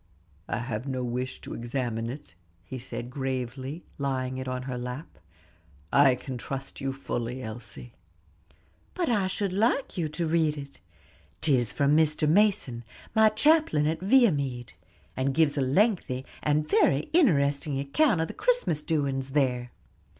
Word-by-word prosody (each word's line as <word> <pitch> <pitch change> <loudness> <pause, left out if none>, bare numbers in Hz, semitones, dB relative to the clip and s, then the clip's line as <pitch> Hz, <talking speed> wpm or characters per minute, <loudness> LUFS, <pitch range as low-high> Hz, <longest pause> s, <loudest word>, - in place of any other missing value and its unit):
"I - - -2
have 120 +1 -4
no 130 -2 -2
wish 125 +1 -3
to - - -7
examine 120 -1 -3
it," 130 -8 -9 0.3
he 130 +8 -7
said 120 0 -5
gravely, 130 +3 -4 0.2
laying 130 -2 -2
it 130 - -5
on 130 0 -3
her 130 -1 -4
lap. 125 +5 -6 0.7
"I 135 -2 +6
can 125 0 -7
trust 135 +2 -6
you 135 0 -1
fully, 125 -2 -4
Elsie." 120 +1 -8 1.0
"But 355 -5 0
I 205 -5 +2
should 190 0 -2
like 225 +2 +1
you 160 -3 0
to 165 +3 -2
read 160 -2 +1
it; 140 -1 -9 0.6
'tis 130 -8 +2
from 140 +8 +2
Mr. 155 -1 +2
Mason, 170 - +2 0.3
my 220 0 +6
chaplain 220 - +3
at 160 +1 0
Viamede, 150 - +2 0.4
and 135 +1 0
gives 150 -2 +3
a 140 - 0
lengthy, 135 - +1 0.2
and 150 +1 +1
very 140 -2 +3
interesting 145 - +3
account 175 - +2
of 165 - 0
the - - -7
Christmas - - +1
doings 135 -4 -1
there." 125 -4 +1
140 Hz, 150 wpm, -27 LUFS, 130-160 Hz, 1.0 s, I